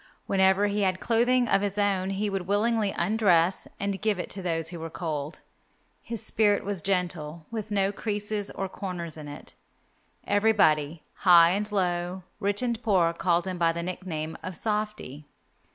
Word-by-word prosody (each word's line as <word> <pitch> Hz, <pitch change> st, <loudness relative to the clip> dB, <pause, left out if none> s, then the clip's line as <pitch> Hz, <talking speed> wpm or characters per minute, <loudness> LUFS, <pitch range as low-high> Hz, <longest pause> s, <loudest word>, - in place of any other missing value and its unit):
Whenever 190 Hz, +1 st, +3 dB
he 205 Hz, 0 st, 0 dB
had 185 Hz, -1 st, +1 dB
clothing 245 Hz, +2 st, +2 dB
of 195 Hz, -, +3 dB
his 205 Hz, 0 st, -2 dB
own 195 Hz, -2 st, +1 dB
he 195 Hz, +2 st, -1 dB
would 195 Hz, -3 st, -3 dB
willingly 210 Hz, +1 st, +1 dB
undress 185 Hz, -2 st, +2 dB
and 200 Hz, -2 st, -2 dB
give 215 Hz, -2 st, +1 dB
it 180 Hz, -, -5 dB
to 190 Hz, -, -4 dB
those 165 Hz, -2 st, -1 dB
who 170 Hz, -1 st, -7 dB
were 165 Hz, 0 st, -5 dB
cold. 155 Hz, -3 st, -4 dB, 0.6 s
His 230 Hz, -2 st, -6 dB
spirit 205 Hz, -3 st, +2 dB
was 200 Hz, -3 st, -3 dB
gentle 170 Hz, -4 st, -2 dB
with 220 Hz, -2 st, -4 dB
no 200 Hz, -1 st, +1 dB
creases 210 Hz, -1 st, -3 dB
or 195 Hz, -, -4 dB
corners 180 Hz, -4 st, -5 dB
in 155 Hz, -2 st, -9 dB
it. 145 Hz, 0 st, -10 dB, 0.7 s
Everybody, 170 Hz, -8 st, +2 dB
high 170 Hz, -2 st, +7 dB
and 210 Hz, +3 st, -2 dB
low, 180 Hz, -1 st, -1 dB, 0.2 s
rich 205 Hz, +2 st, 0 dB
and 235 Hz, -2 st, -1 dB
poor, 185 Hz, -7 st, +2 dB
called 175 Hz, 0 st, +1 dB
him 185 Hz, -2 st, -4 dB
by 165 Hz, -1 st, +3 dB
the 170 Hz, +1 st, -4 dB
nickname 170 Hz, -3 st, -4 dB
of 185 Hz, -1 st, -5 dB
Softy. 210 Hz, -, -3 dB
190 Hz, 170 wpm, -27 LUFS, 170-205 Hz, 0.7 s, high